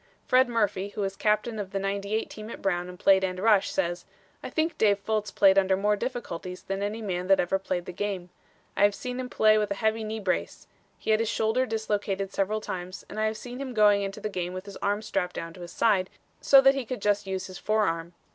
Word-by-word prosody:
Fred 255 0 +4
Murphy, 210 -4 0
who - - -2
was 195 -1 -2
captain 215 +2 0
of 200 -2 -4
the 195 - -3
'98 200 +2 -2
team 215 0 -9
at - - -7
Brown 180 -2 -1
and 180 - -10
played 190 +1 +4
end 185 -1 -1
rush, 205 -1 +4
says: 175 -2 -1 0.4
"I - - -6
think 320 +1 0
Dave 205 -2 +4
Fultz 210 +1 -2
played 195 -1 +5
under 190 -1 +2
more 210 +2 +2
difficulties 185 -7 -5
than 195 0 -3
any 210 +2 -3
man 180 -3 -2
that 195 0 +5
ever 195 +2 +1
played 185 -2 -3
the - - -6
game. 185 -1 -4 0.4
I - - -1
have 205 0 +5
seen 250 0 -5
him 255 -1 -4
play 215 -2 +4
with 210 - 0
a 200 - -1
heavy 220 +2 0
knee 220 +1 -4
brace. 190 -3 -2 0.3
He - - -2
had 215 - +4
his 225 -1 0
shoulder 225 +4 +1
dislocated 205 -3 -2
several 210 +2 0
times 185 -1 -6
and - - -6
I 215 - +2
have 215 0 -3
seen 245 +2 -8
him 260 -3 -5
going 205 -1 +5
into 195 0 -4
the - - -3
game 180 -3 -3
with 185 +1 -6
his 200 - -9
arm 205 +1 -1
strapped 180 -4 -2
down 165 0 -5
to 180 - -12
his 175 -1 -8
side, 190 -2 +2 0.3
so 270 -1 +7
he 270 0 +4
could 250 +1 -5
just 205 -1 +1
use 190 0 -3
his 185 -1 -9
forearm. 170 -6 0
200 Hz, 240 wpm, -27 LUFS, 190-220 Hz, 0.4 s, so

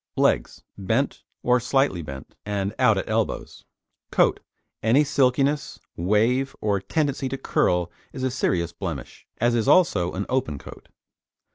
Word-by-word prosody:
LEGS - - +1 0.2
Bent, 95 - 0 0.2
or 125 0 +4
slightly 125 -6 +1
bent, 70 -3 -9
and 100 -1 -2
out 120 -5 +5
at - - -2
elbows. 110 0 -2 0.4
COAT - - +3 0.4
Any 120 +7 +4
silkiness, 140 0 +1 0.2
wave 115 +9 +1
or 100 -2 +1
tendency 140 +4 -1
to 135 - -3
curl 90 -8 +1 0.2
is 130 - -6
a 130 - +1
serious 85 -9 0
blemish, 85 -9 -6
as 120 +1 +2
is 115 -2 +1
also 100 - +4
an 100 +2 -3
open 125 - -1
coat. - - -12
110 Hz, 140 wpm, -24 LUFS, 90-130 Hz, 0.4 s, out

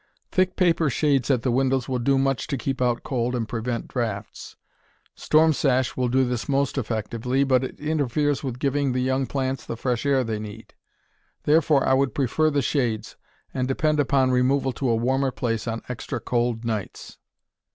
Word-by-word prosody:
Thick 185 0 +1
paper 170 -4 +2
shades 135 0 +1
at 125 -4 +2
the 125 - +1
windows 130 0 +1
will 130 -2 -1
do 135 +3 +2
much 135 -1 0
to 140 - -2
keep 130 +2 -3
out 120 -1 +1
cold 125 -1 -1
and 115 -3 -2
prevent 115 +1 -3
draughts. 110 -5 -4 0.6
Storm 160 +1 +3
sash 130 -3 +1
will 125 -1 0
do 130 +2 +2
this 125 0 -3
most 140 0 +1
effectively, 120 +2 -1
but 130 -2 +2
it 130 - -6
interferes 145 -1 0
with 130 -3 -4
giving 140 0 0
the 130 - 0
young 130 +1 0
plants 130 -1 -2
the 115 - -6
fresh 120 -1 -1
air 140 -2 +2
they 110 -2 -3
need. 105 +1 -9 0.7
Therefore 150 -2 +3
I - - +4
would 135 0 +1
prefer 145 +4 +2
the 145 -2 0
shades, 115 -6 -1 0.4
and 130 -1 -1
depend 150 +3 +1
upon 135 -2 +2
removal 130 +2 +2
to 130 0 -2
a 115 - +3
warmer 130 +4 +1
place 115 -3 -2
on 115 0 -3
extra 125 -2 -4
cold 120 -1 -1
nights. 110 -4 -5
130 Hz, 185 wpm, -24 LUFS, 120-140 Hz, 0.7 s, I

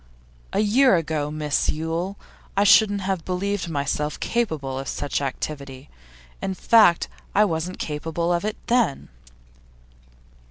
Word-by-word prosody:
'A - - +1
year 235 +3 +4
ago, 155 -3 -1
Miss 150 -1 -1
Yule, 165 +5 -2 0.4
I 200 - +5
shouldn't 200 0 +5
have 190 -3 -2
believed 185 +1 -2
myself 150 0 -2
capable 155 - -2
of 135 - -6
such 145 0 -2
activity. 140 0 -5 0.5
In 190 - -2
fact 215 -5 +5 0.3
I 210 +2 +6
wasn't 170 0 -3
capable 165 +3 -2
of 175 - 0
it 215 0 -3
then. 235 - +1
170 Hz, 125 wpm, -23 LUFS, 150-200 Hz, 0.5 s, I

